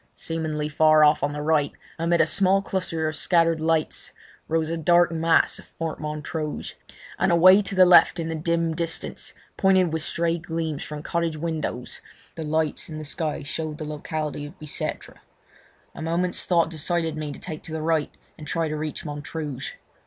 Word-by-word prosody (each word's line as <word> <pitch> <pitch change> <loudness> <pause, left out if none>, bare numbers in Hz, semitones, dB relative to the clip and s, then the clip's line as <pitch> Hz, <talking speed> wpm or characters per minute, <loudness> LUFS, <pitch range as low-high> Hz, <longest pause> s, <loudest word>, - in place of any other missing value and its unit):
Seemingly 155 -2 -3
far 155 0 +5
off 150 0 +5
on 145 - 0
the 150 0 -4
right, 150 -2 +2 0.3
amid 170 +1 +3
a - - +5
small 195 +4 +3
cluster 165 -5 -2
of 155 - -3
scattered 165 -1 +2
lights, 160 -1 0 0.3
rose 160 0 0
a - - 0
dark 170 +2 +4
mass 165 0 +2
of - - -13
Fort 165 -1 -5
Montrouge, 150 0 -4 0.5
and 190 0 +3
away 185 +4 +7
to 195 -1 -4
the 185 0 +7
left 180 0 +6
in 165 - -2
the 165 - -2
dim 165 +1 0
distance, 165 0 -3 0.2
pointed 185 -4 +3
with 160 - -1
stray 170 +1 0
gleams 160 -3 -3
from 150 -1 -6
cottage 170 -2 -1
windows, 155 -6 -4 0.3
the 165 - -7
lights 155 0 -1
in 155 - -6
the 155 - -6
sky 155 0 -2
showed 155 +2 -3
the 155 - -5
locality 150 0 -4
of 160 +6 -14
Bicêtre. 155 -3 -4 0.8
A - - -9
moment's 170 +3 0
thought 170 -2 +3
decided 165 0 -1
me 155 -1 -4
to - - -8
take 155 -4 -7
to 165 - -11
the 160 -1 -3
right 160 -2 +1 0.3
and 150 - -9
try 165 +2 0
to 155 - -3
reach 155 +1 -4
Montrouge. 145 -2 -5
160 Hz, 180 wpm, -25 LUFS, 155-170 Hz, 0.8 s, away